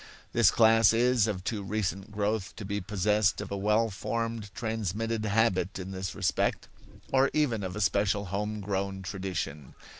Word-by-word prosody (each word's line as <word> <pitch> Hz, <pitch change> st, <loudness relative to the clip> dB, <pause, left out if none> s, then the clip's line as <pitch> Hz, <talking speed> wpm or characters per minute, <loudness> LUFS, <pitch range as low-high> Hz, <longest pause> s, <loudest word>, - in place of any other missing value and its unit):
This 115 Hz, -4 st, +6 dB
class 115 Hz, -1 st, +5 dB
is 120 Hz, -1 st, +3 dB
of 95 Hz, -4 st, -3 dB
too 105 Hz, +1 st, -2 dB
recent 100 Hz, -1 st, -2 dB
growth 105 Hz, 0 st, -2 dB
to 105 Hz, -, -7 dB
be 100 Hz, +1 st, -2 dB
possessed 105 Hz, +2 st, +1 dB
of -, -, -6 dB
a -, -, -1 dB
well 105 Hz, +3 st, +2 dB
formed 115 Hz, +1 st, -3 dB
transmitted 110 Hz, 0 st, -2 dB
habit 100 Hz, -3 st, +1 dB
in 95 Hz, 0 st, -6 dB
this 95 Hz, -1 st, -4 dB
respect, -, -, 0 dB, 0.5 s
or 135 Hz, +1 st, +4 dB
even 135 Hz, -8 st, +1 dB
of 90 Hz, -1 st, -4 dB
a 105 Hz, -, -3 dB
special 100 Hz, 0 st, +1 dB
home 105 Hz, +1 st, -2 dB
grown 95 Hz, -1 st, -3 dB
tradition. 90 Hz, -8 st, -5 dB
105 Hz, 160 wpm, -29 LUFS, 95-110 Hz, 0.5 s, This